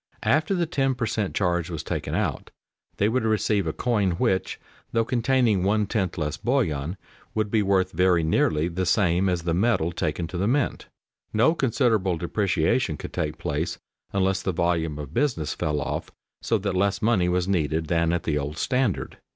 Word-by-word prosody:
After 155 +6 +2
the 175 -2 +1
ten 135 -4 0
per 125 -1 -1
cent. 105 -3 -2
charge 90 -2 0
was 80 -3 -4
taken - - -3
out - - -2 0.5
they 100 - +3
would 120 +2 +1
receive 105 -3 +1
a - - +1
coin 105 -3 0
which, 95 +2 0 0.3
though 115 0 +1
containing 120 -4 +2
one 105 +3 +2
tenth 95 -5 -2
less 75 -2 -2
bullion, 90 - -1 0.4
would 110 -2 0
be 110 - +3
worth 95 -2 +2
very 90 0 +3
nearly 80 0 +2
the 90 +1 -2
same 95 -1 +2
as 90 -2 -1
the 85 -1 0
metal 90 -3 +2
taken 85 0 -2
to 90 - -4
the 100 - +1
mint. 140 +5 0 0.5
No 115 +9 +4
considerable 115 - +1
depreciation 90 +1 0
could - - -8
take 75 0 -2
place 80 0 -2 0.3
unless 95 -1 +1
the 95 - -1
volume 80 -3 0
of 75 -1 -7
business 115 - 0
fell 75 -1 -1
off - - -3 0.3
so 115 - +1
that 100 -1 -2
less 100 +2 0
money 100 -6 +3
was 90 0 0
needed 80 -4 0
than 85 +1 +1
at 85 -1 -1
the 75 -2 0
old 75 +2 -4
standard. 125 - -1
95 Hz, 185 wpm, -25 LUFS, 85-110 Hz, 0.5 s, No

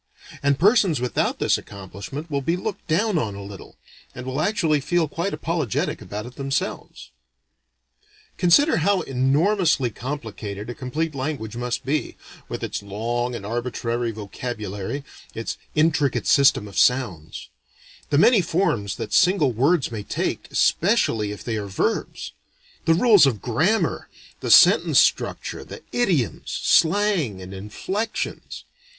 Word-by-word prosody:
And 140 -1 +2
persons 195 - +4
without 125 -1 -1
this - - +1
accomplishment 100 - -9
will 140 -1 0
be 165 +6 0
looked 200 +1 -5
down 185 +3 +1
on 105 -7 -3
a 100 - -7
little, 100 -2 -11 0.4
and 125 - -7
will 130 +3 -2
actually 160 -6 +1
feel 165 +3 0
quite 170 +6 -3
apologetic 160 - -2
about 105 +2 -6
it 125 +1 -11
themselves. 135 0 -4 1.2
Consider 235 - +4
how 190 +3 +2
enormously 140 - +1
complicated 110 -5 -6
a - - -5
complete 150 +6 -3
language 130 -5 -4
must 120 0 -3
be, 145 +3 -2 0.3
with - - -5
its - - -3
long 120 +5 -3
and 100 - -7
arbitrary 120 +1 -2
vocabulary, 110 +2 -5 0.3
its 115 - -4 0.2
intricate 150 -4 +2
system 140 -7 +4
of 100 -2 -3
sounds; 105 -12 0 0.6
the 145 - +2
many 220 - +6
forms 160 - 0
that - - -6
single 180 -7 +4
words 135 +5 +1
may 110 -2 -4
take, 100 - -3
especially 105 -2 +2
if 105 - -8
they 115 -2 -2
are 105 -1 -4
verbs; 95 - -2 0.5
the 165 0 +4
rules 205 - +6
of 115 -6 -1
grammar, 160 - 0 0.3
the - - -4
sentence - - +6
structure, - - 0
the - - -11
idioms, 180 - 0
slang 170 - +2
and 95 +1 -9
inflections. 185 - -4
135 Hz, 135 wpm, -23 LUFS, 110-165 Hz, 1.2 s, many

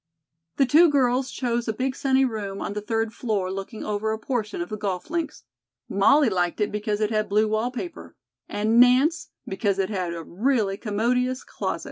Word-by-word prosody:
The 275 - +3
two 320 +7 +6
girls 260 -2 +2
chose 240 -2 -2
a 220 - 0
big 260 +3 -2
sunny 265 -1 +2
room 205 -5 -4
on - - -4
the 210 - -4
third 225 +1 -1
floor 205 -6 -2
looking 195 +3 -6
over 215 +1 -1
a 220 - -1
portion 220 -4 -3
of 175 - -4
the 215 - -3
golf 200 - -4
links. 330 - -3 0.4
Molly 270 +9 +4
liked 180 -3 0
it 210 - 0
because 210 0 -2
it 215 +1 +1
had 215 -1 0
blue 210 +2 +3
wallpaper 245 +10 -4 0.3
and 215 +3 +2
Nance 265 +7 +4 0.2
because 195 0 -1
it 195 +1 -1
had 180 -4 -2
a 165 - -6
really 210 - 0
commodious 250 +5 0
closet. - - -3
220 Hz, 185 wpm, -24 LUFS, 205-255 Hz, 0.4 s, two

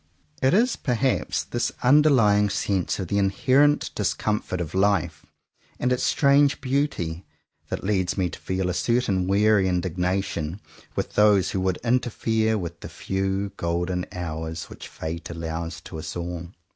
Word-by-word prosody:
It 130 +6 +4
is 240 +4 +3
perhaps 125 0 0
this 120 - -2
underlying 125 -7 +5
sense 100 -3 -1
of 95 - -4
the 100 +4 0
inherent 135 +9 +3
discomfort 105 -4 -1
of 85 -2 -4
life, 95 -2 +1 0.5
and 125 +1 +1
its 125 - -1
strange 140 0 +3
beauty, 130 - -1 0.5
that - - -4
leads 95 -2 0
me 95 -2 +1
to - - -9
feel 95 0 -2
a 90 - -1
certain 100 -4 +1
weary 100 0 +3
indignation 90 -1 -1 0.4
with - - -3
those 105 -3 +4
who 95 - -1
would 95 -1 0
interfere 115 -2 +1
with 85 -3 -6
the - - -8
few 95 +1 -2
golden 90 +1 -1
hours 80 -2 -5
which - - -9
fate 80 +2 -6
allows 85 0 -5
to 80 - -8
us - - -6
all. 85 0 -4
95 Hz, 145 wpm, -24 LUFS, 90-115 Hz, 0.5 s, underlying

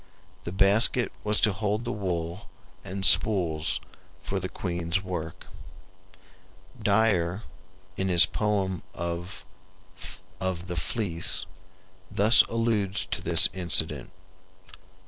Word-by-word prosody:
The 85 - -5
basket 100 +6 +4
was 105 0 +1
to 105 - +3
hold 105 +3 -3
the 120 - -3
wool 90 -3 -5 0.3
and 95 +1 -3
spools 85 -8 +4 0.4
for 95 - -3
the 95 0 -5
queen's 85 0 -3
work. 85 -4 -6 1.4
Dyer, 100 -3 +1 0.5
in 95 - -2
his 90 -2 +8
poem 100 -4 -2
of 85 +2 -6 0.9
the 90 -1 -4
"Fleece," 90 0 -1 0.6
thus 110 +6 +5
alludes 110 -3 -1
to - - 0
this - - +5
incident 90 0 -1
95 Hz, 100 wpm, -26 LUFS, 85-105 Hz, 1.4 s, his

